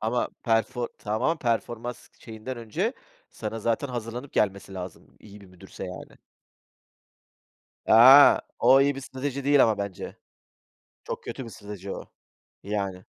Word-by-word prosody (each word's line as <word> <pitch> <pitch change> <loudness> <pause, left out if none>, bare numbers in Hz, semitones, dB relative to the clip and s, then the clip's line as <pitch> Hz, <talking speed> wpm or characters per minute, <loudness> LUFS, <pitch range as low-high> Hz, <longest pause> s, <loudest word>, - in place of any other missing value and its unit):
Ama 115 +3 0
perfor 115 +1 0
tamam, 120 +10 -1
performans 120 -1 -3
şeyinden 115 +3 -8
önce, 155 - -2 0.4
sana 110 0 -5
zaten 115 +5 -1
hazırlanıp 120 +2 -6
gelmesi 100 -2 -1
lazım. 90 -2 -9
İyi 105 0 -14
bir 100 - -15
müdürse 90 -1 -11
yani. - - -9 1.7
A! 130 +6 +9 0.2
O 130 +3 +6
iyi 140 0 +2
bir 135 - -6
strateji 135 +1 -5
değil 140 0 +5
ama 110 -2 +2
bence. 100 -2 -6 0.9
Çok - - -6
kötü 130 - -6
bir 115 - -9
strateji 100 -2 -9
o, - - -7 0.6
yani. 100 -2 -4
115 Hz, 130 wpm, -26 LUFS, 105-130 Hz, 1.7 s, A